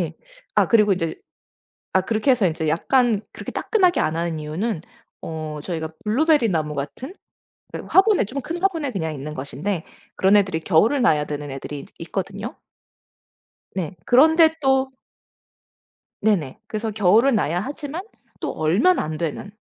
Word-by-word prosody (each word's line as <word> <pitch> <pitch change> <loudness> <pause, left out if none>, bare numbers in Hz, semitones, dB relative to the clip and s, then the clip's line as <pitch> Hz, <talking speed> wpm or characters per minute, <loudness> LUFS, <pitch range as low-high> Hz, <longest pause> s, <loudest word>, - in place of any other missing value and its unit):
예 - - -3 0.4
아 - - +5
그리고 210 -3 +5
이제 165 -3 -1 0.8
아 190 - +4
그렇게 220 +7 +1
해서 230 -7 +3
이제 160 -1 -2
약간 225 - +2
그렇게 - - -7
따끈하게 370 -6 +2
안 155 - 0
하는 165 -1 -2
이유는 160 +5 -3 0.4
어 155 -2 -5
저희가 160 -2 -4 0.2
블루베리 285 +1 +3
나무 155 -3 -1
같은 145 - -6 0.6
그 - - -4
화분에, 395 +1 +5
좀 255 +8 -5
큰 335 +6 -5
화분에 330 -8 0
그냥 160 -7 -3
있는 150 +1 -6
것인데 155 +7 -4 0.3
그런 195 +2 +4
애들이 185 -5 +1
겨울을 215 - +3
나야 150 -10 +3
되는 145 -1 -5
애들이 135 +2 -6
이 - - -10
있거든요. 195 +6 -5 1.2
네 185 -1 -3
그런데 320 +5 +5
또 265 0 +2 1.3
네네. 185 -11 +1
그래서 220 0 -3
겨울은 215 +6 +4
나야 170 -3 0
하지만 290 - -5 0.4
또 - - -3
얼면 195 - +2
안 155 0 -3
되는 170 +4 -4
195 Hz, 310 characters per minute, -22 LUFS, 160-260 Hz, 1.3 s, 아